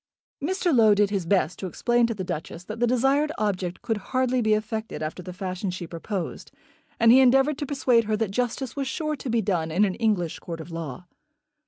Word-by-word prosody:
Mr. 355 -1 +1
Low 220 -3 +6
did 205 0 +2
his 190 -5 -2
best 180 -3 +1
to 190 - -3
explain 240 +5 +2
to 230 - -3
the 190 - -4
Duchess 165 0 -5
that 215 +4 -7
the 240 - +3
desired 270 +5 +2
object 185 -4 -2
could 225 -2 0
hardly 255 +4 0
be 215 -1 +3
effected 220 -4 -4
after 155 +4 -4
the 180 - -8
fashion 185 +1 -4
she 180 -1 -5
proposed, 170 +2 -5 0.5
and 230 0 +6
he 255 - +8
endeavoured 270 +3 +4
to 290 - -3
persuade 250 -5 +2
her 215 0 0
that 215 -3 -1
justice 245 +2 -2
was 275 -2 -2
sure 305 +2 -2
to 260 - -6
be 230 -1 +1
done 175 -5 0
in 185 +6 +3
an 190 - -1
English 195 -7 0
court 165 -1 -7
of 160 +2 -9
law. 165 -1 -6
215 Hz, 215 wpm, -25 LUFS, 180-250 Hz, 0.5 s, he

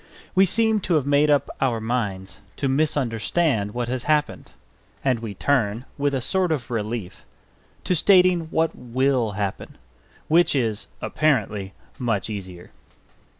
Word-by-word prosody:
We 190 0 +5
seem 220 +2 +2
to 180 -3 0
have 145 -4 +1
made 145 +1 +3
up 145 -1 +3
our 125 -4 +1
minds 105 -5 -3
to 140 - -2
misunderstand 130 -4 0
what 120 -1 -2
has 125 0 -3
happened; 150 -1 0 0.5
and 130 -3 +2
we 110 -3 -6
turn, 120 -2 0
with 140 -1 0
a 130 - -1
sort 185 +6 +1
of 130 -6 -2
relief, 110 -3 -4 0.6
to - - +1
stating 180 -1 +4
what 160 0 0
will 125 -2 0
happen 100 -1 -4 0.5
which 165 -1 +3
is 115 -6 -1 0.2
(apparently) 105 -10 0 0.3
much 110 -5 -1
easier. 95 -4 -8
130 Hz, 140 wpm, -23 LUFS, 110-155 Hz, 0.6 s, We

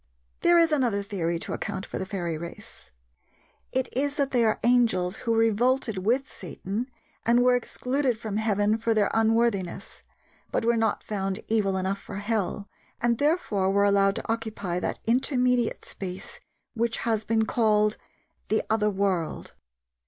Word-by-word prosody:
There 345 0 +5
is 335 -1 +4
another 240 -9 +1
theory 175 -4 -2
to - - -4
account 200 -2 -4
for - - -5
the 190 - -4
fairy 175 -4 -3
race. 170 - -9 0.8
It 260 -1 0
is 285 +2 0
that 280 -3 0
they 245 -2 +3
are 220 -1 +2
angels 225 -6 +2
who 230 -1 -1
revolted 225 0 +2
with 245 +8 +1
Satan 200 - -5 0.3
and 240 +1 +4
were 250 0 +5
excluded 250 +1 -1
from 215 -2 -4
heaven 215 0 +1
for 225 0 +1
their 210 -2 +2
unworthiness, 225 -4 0 0.5
but - - 0
were 235 0 +3
not 225 -2 0
found 195 -2 -3
evil 205 -4 +1
enough 190 +1 -1
for 200 - -9
hell, 205 -1 -2 0.3
and 235 -1 +1
therefore 285 - +1
were 200 +1 +3
allowed 200 -1 +3
to - - -5
occupy 220 -6 -2
that - - -2
intermediate 250 0 +1
space 190 - -6 0.3
which 235 -1 -1
has 220 -2 +1
been 220 0 +1
called 215 -2 +2 0.5
"the 220 - +1
Other 215 -1 +2
World." 190 -5 -1
220 Hz, 155 wpm, -26 LUFS, 195-240 Hz, 0.8 s, There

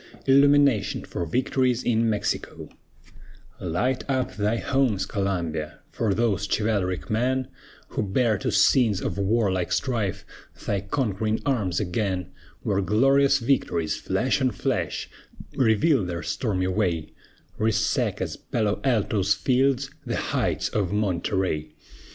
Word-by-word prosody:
ILLUMINATION 140 -5 +4
FOR 85 - -4
VICTORIES 125 - +1
IN 115 -1 +2
MEXICO 105 -2 -3 0.9
Light 110 +10 -1
up 130 -7 -1
thy 105 +3 0
homes, 120 -8 +1
Columbia, 85 -7 -3
For 105 -4 0
those 105 -3 0
chivalric 95 -7 -1
men 130 +4 0 0.4
Who - - -2
bear 110 +1 +1
to - - -1
scenes 110 -7 +4
of - - -3
warlike 100 -3 +1
strife 115 -8 -1 0.4
Thy 100 -2 0
conquering 110 -1 -1
arms 105 - 0
again, 95 -1 -2 0.3
Where 100 -1 +1
glorious 135 +8 +4
victories, 115 - 0
flash 130 +3 0
on 130 - +3
flash, 105 - -2 0.5
Reveal 125 +2 +3
their 85 -2 -4
stormy 100 - -1
way, 90 -4 -1 0.5
Resaca's, 110 0 0
Palo 105 -3 -2
Alto's 105 -6 +2
fields, 135 +5 +1
The - - -3
heights - - -1
of 100 -4 -1
Monterey! 90 -6 -1
105 Hz, 115 wpm, -25 LUFS, 95-125 Hz, 0.9 s, ILLUMINATION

